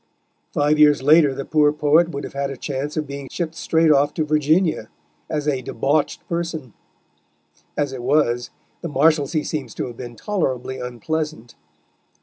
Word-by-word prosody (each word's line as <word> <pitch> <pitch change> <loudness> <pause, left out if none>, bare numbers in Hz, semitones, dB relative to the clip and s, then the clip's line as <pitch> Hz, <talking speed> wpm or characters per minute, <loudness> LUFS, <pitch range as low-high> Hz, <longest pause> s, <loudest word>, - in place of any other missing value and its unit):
Five 150 +1 +2
years 150 -2 +5
later 150 0 +6
the 135 0 -5
poor 150 -1 +3
poet 155 +3 +3
would 140 -3 -5
have - - -7
had 140 0 -2
a 135 - -6
chance 145 +4 -4
of 155 - 0
being 140 -1 -7
shipped 170 -2 -3
straight 165 -1 +2
off 145 0 +3
to 155 - 0
Virginia, 155 - +1 0.4
as 150 -2 -2
a 135 -3 0
"debauched 140 +5 -1
person"; 165 -8 -4 1.0
as 145 -2 0
it 130 - -6
was, 120 -2 +1 0.3
the 170 - -4
Marshalsea 150 +1 +2
seems 135 -8 -4
to - - -3
have 120 -2 -8
been 120 -2 -8
tolerably 130 - -2
unpleasant. 125 +1 -4
145 Hz, 160 wpm, -21 LUFS, 135-155 Hz, 1.0 s, later